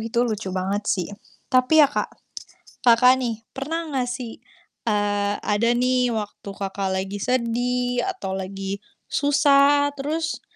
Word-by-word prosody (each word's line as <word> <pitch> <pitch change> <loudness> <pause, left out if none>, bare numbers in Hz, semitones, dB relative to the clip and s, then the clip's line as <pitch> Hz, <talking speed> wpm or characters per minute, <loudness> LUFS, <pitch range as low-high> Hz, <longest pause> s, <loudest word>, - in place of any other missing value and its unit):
itu 225 +1 -3
lucu 215 -4 -3
banget 200 +3 -1
sih. 180 -4 0 0.4
Tapi 260 +5 +6
ya - - +5
Kak, - - -1 0.7
Kakak 250 +1 +6
nih, 225 -2 -3
pernah 325 +5 -3
enggak 265 -5 -2
sih, 245 -2 -6 0.5
eee, 205 -1 +1
ada 210 +3 +1
nih 250 0 +2
waktu 210 -3 -5
Kakak 195 0 -3
lagi 195 +2 -3
sedih, 245 0 0
atau 350 - -4
lagi 195 +1 -4 0.2
susah, 285 0 +4
terus, 310 +3 -3
240 Hz, 130 wpm, -23 LUFS, 205-275 Hz, 0.7 s, Tapi